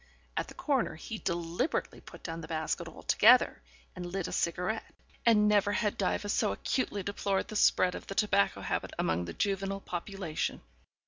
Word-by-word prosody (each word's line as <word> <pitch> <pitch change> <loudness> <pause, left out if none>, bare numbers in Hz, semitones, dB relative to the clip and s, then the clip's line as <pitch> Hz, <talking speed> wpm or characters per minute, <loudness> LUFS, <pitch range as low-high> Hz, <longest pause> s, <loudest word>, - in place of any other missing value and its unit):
At - - -1
the - - -11
corner 265 - 0
he 215 +7 -6
deliberately 170 - -2
put - - -13
down 165 -1 -5
the 160 - -8
basket 160 -1 -2
altogether - - +4 0.3
and 180 - -6
lit 175 +1 -3
a - - -6
cigarette, 180 +6 -1 0.3
and 210 -2 +6
never 205 -1 +3
had 210 -1 0
Diva 200 +1 0
so 205 - +1
acutely 205 -6 -1
deplored 200 -1 -1
the 215 - -6
spread 185 -3 +4
of - - -8
the 195 - -5
tobacco 200 -2 +2
habit - - -2
among 85 +1 0
the 85 - -6
juvenile 195 0 -1
population. 180 -3 -3
195 Hz, 170 wpm, -31 LUFS, 170-205 Hz, 0.3 s, and